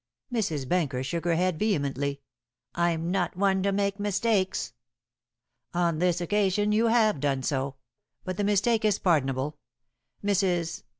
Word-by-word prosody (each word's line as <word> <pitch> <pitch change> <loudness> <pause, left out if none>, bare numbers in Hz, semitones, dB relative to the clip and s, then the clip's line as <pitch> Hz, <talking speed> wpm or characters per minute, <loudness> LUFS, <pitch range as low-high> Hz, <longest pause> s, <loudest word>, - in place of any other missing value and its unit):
Mrs. 160 - -1
Benker 145 -7 0
shook 170 +5 -3
her 170 -1 +2
head 180 -1 0
vehemently. 140 - -1 0.5
"I'm 170 0 0
not 180 -3 0
the - - -20
one 190 -1 +2
to 200 +1 +1
make 200 0 0
mistakes." 205 -1 0 1.0
"On 170 -3 +1
this 175 -1 +2
occasion 205 +3 +1
you 220 +2 +3
have 220 -7 +3
done 135 -2 0
so; 135 0 -1 0.5
but 185 -1 -4
the 205 - -1
mistake 210 +3 +2
is 210 -2 +3
pardonable. 145 -4 0 0.7
Mrs. 180 -5 0
180 Hz, 140 wpm, -27 LUFS, 155-205 Hz, 1.0 s, you